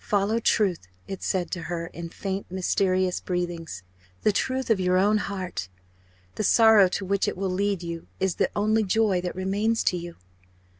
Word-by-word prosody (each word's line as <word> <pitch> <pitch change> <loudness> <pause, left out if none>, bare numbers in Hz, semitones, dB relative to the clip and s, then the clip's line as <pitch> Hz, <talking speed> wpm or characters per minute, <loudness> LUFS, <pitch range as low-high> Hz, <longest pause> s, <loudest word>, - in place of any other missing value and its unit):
"Follow 205 +2 +1
truth!" 195 - +1 0.2
it 195 - -6
said 185 -2 -1
to 175 - -3
her 170 0 -4
in 170 0 -8
faint 195 +2 -5
mysterious 185 0 +1
breathings 175 - -4 0.4
"the 215 - +4
truth 260 +4 -1
of 215 - +3
your 180 0 +2
own 205 +3 +3
heart. 185 - -4 0.7
The - - -1
sorrow 220 -2 +6
to 190 +2 -3
which 200 +1 +1
it - - -2
will 190 -1 -1
lead 195 -1 0
you 170 -1 -6
is 190 -2 0
the - - +2
only 215 +2 +2
joy 200 -2 +2
that 180 0 -4
remains 205 +5 0
to 180 - +1
you." 170 0 -7
190 Hz, 180 wpm, -26 LUFS, 180-205 Hz, 0.7 s, sorrow